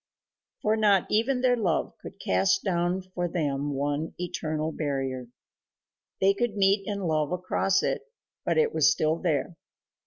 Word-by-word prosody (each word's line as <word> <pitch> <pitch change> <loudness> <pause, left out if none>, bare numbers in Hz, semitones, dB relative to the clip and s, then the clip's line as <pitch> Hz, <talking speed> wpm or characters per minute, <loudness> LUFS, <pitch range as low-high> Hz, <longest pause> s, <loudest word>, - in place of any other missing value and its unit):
For 215 +1 +3
not 205 -4 +3
even 250 +4 +2
their 250 -1 +4
love 195 -9 0
could - - -10
cast 95 0 +2
down 180 0 0
for 180 -1 -3
them 145 -4 -2
one 145 +3 -2
eternal 160 -3 -3
barrier. 135 -5 -3 0.9
They 195 +1 +4
could 215 +1 -1
meet 195 0 +3
and 200 -2 -3
love 155 -3 0
across 185 +1 +1
it, - - 0 0.4
but - - 0
it 460 -2 +3
was 160 - +5
still 155 0 +1
there. 165 0 -1
175 Hz, 150 wpm, -27 LUFS, 150-200 Hz, 0.9 s, was